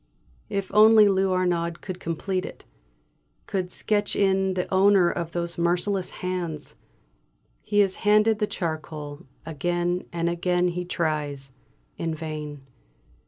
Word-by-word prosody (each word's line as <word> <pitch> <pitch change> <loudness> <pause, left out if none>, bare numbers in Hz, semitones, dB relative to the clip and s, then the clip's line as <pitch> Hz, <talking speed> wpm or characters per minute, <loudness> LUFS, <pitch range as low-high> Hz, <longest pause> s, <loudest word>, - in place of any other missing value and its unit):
If 195 -1 -3
only 215 0 +7
Lou 190 -1 +2
Arnaud 175 -2 +1
could 185 -2 -6
complete 185 +2 -2
it - - -9 0.8
could 185 -2 -2
sketch 205 +2 0
in 190 -1 +2
the 180 - 0
owner 190 -2 +5
of 170 -1 -4
those 170 0 -3
merciless 180 +2 0 0.2
hands. 170 -5 -3 0.9
He 205 0 +3
is 195 -2 +1
handed 215 +1 +3
the 210 - +1
charcoal; 155 -5 -5 0.2
again 175 +3 -1
and 170 0 -1
again 180 +1 +1
he 180 +1 -4
tries 150 -5 -2 0.5
in 165 -1 -2
vain. 150 -3 -6
180 Hz, 125 wpm, -25 LUFS, 165-195 Hz, 0.9 s, only